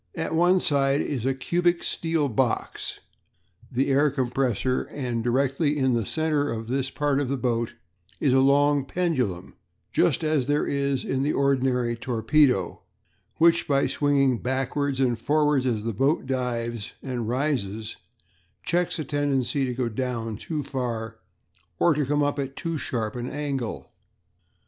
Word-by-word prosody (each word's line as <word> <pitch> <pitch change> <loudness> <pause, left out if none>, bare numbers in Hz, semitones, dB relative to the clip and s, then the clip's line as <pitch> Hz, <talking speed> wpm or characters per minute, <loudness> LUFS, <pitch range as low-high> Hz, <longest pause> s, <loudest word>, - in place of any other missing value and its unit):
"At 160 -1 -3
one 175 +3 +4
side 140 -3 +2
is 130 -4 -2
a 135 - +1
cubic 175 +5 +1
steel 165 -3 0
box 125 -1 -2 0.7
the 130 +3 +1
air 145 +2 +4
compressor; 130 -2 0
and 120 -5 -3
directly 135 +5 +1
in 130 -2 +2
the 115 -3 0
centre 155 -2 0
of 115 -1 -4
this 135 +2 -1
part 145 0 0
of 140 - -1
the 140 - 0
boat 120 -2 -1 0.4
is 135 -4 +2
a 130 - +5
long 140 +1 +4
pendulum, 130 - -1 0.4
just - - +2
as 155 -5 +1
there 145 +1 +1
is 140 -1 -1
in 130 - -1
the 145 +2 +1
ordinary 130 -3 +1
torpedo, 120 - +1 0.6
which, 170 +1 +4
by 140 -1 +3
swinging 140 -4 +2
backwards 135 +2 -1
and 120 -4 +1
forwards 145 0 +2
as 110 -4 -1
the 115 0 -2
boat 135 - +1
dives 120 -4 -3
and 120 -4 -3
rises, 120 -6 -2 0.7
checks 175 0 +1
a 155 - -2
tendency 140 -2 0
to 125 - -2
go 125 -1 -1 0.5
too 150 +7 -4
far 120 -5 -3
down, - - -23 0.6
or 170 - +4
to 145 -2 -1
come 145 +1 +2
up 145 0 0
at 135 0 -4
too 165 -2 -3
sharp 115 -7 -3
an 120 +1 -4
angle. 140 -6 -4
135 Hz, 155 wpm, -25 LUFS, 125-145 Hz, 0.7 s, a